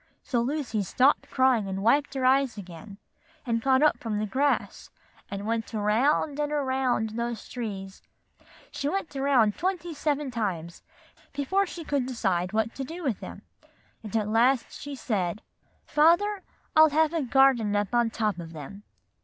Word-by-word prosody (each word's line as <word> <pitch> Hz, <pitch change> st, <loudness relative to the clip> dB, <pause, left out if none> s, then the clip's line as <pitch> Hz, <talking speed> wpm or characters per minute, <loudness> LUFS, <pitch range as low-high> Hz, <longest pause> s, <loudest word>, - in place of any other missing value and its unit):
So 240 Hz, -4 st, 0 dB
Lucy 260 Hz, -3 st, -2 dB
Ann -, -, 0 dB
stopped 255 Hz, +9 st, +2 dB
sobbing, 260 Hz, -6 st, +2 dB
and 195 Hz, 0 st, -4 dB
wiped 275 Hz, +5 st, +2 dB
her 260 Hz, -1 st, -1 dB
eyes 265 Hz, -2 st, +3 dB
again, 195 Hz, +1 st, -10 dB, 0.5 s
and 230 Hz, -2 st, 0 dB
got 265 Hz, +3 st, +3 dB
up 305 Hz, -, +3 dB
from 220 Hz, -3 st, -3 dB
the 215 Hz, -, -1 dB
grass, 275 Hz, +6 st, -1 dB, 0.4 s
and 200 Hz, 0 st, -5 dB
went 225 Hz, 0 st, -2 dB
around 260 Hz, +8 st, +1 dB
and 295 Hz, 0 st, -1 dB
around 260 Hz, -6 st, 0 dB
those 235 Hz, 0 st, -4 dB
trees; 195 Hz, -5 st, -6 dB, 0.7 s
she 285 Hz, -, -2 dB
went 375 Hz, -4 st, -3 dB
around 270 Hz, -6 st, +2 dB
twenty 350 Hz, -2 st, -2 dB
seven 290 Hz, -2 st, -1 dB
times 185 Hz, -7 st, -3 dB, 0.5 s
before 375 Hz, +8 st, 0 dB
she 345 Hz, -1 st, -7 dB
could 280 Hz, -4 st, -1 dB
decide 190 Hz, -8 st, -1 dB
what 220 Hz, +1 st, -1 dB
she -, -, -6 dB
would 265 Hz, -, -4 dB
do 340 Hz, +3 st, -7 dB
with 250 Hz, -9 st, -1 dB
them. -, -, -9 dB, 0.6 s
And 215 Hz, -2 st, -8 dB
at 210 Hz, -1 st, -1 dB
last 235 Hz, +3 st, +2 dB
she 285 Hz, -1 st, -7 dB
said, 200 Hz, -6 st, -2 dB, 0.4 s
'Father, 360 Hz, +7 st, +3 dB, 0.3 s
I'll 315 Hz, 0 st, +8 dB
have 315 Hz, +2 st, +2 dB
a 330 Hz, -, 0 dB
garden 255 Hz, -5 st, +3 dB
up 205 Hz, +1 st, -1 dB
on 240 Hz, -1 st, +3 dB
top 215 Hz, -4 st, -1 dB
of 165 Hz, -1 st, -8 dB
them. 160 Hz, +6 st, -9 dB
245 Hz, 170 wpm, -27 LUFS, 210-285 Hz, 0.7 s, I'll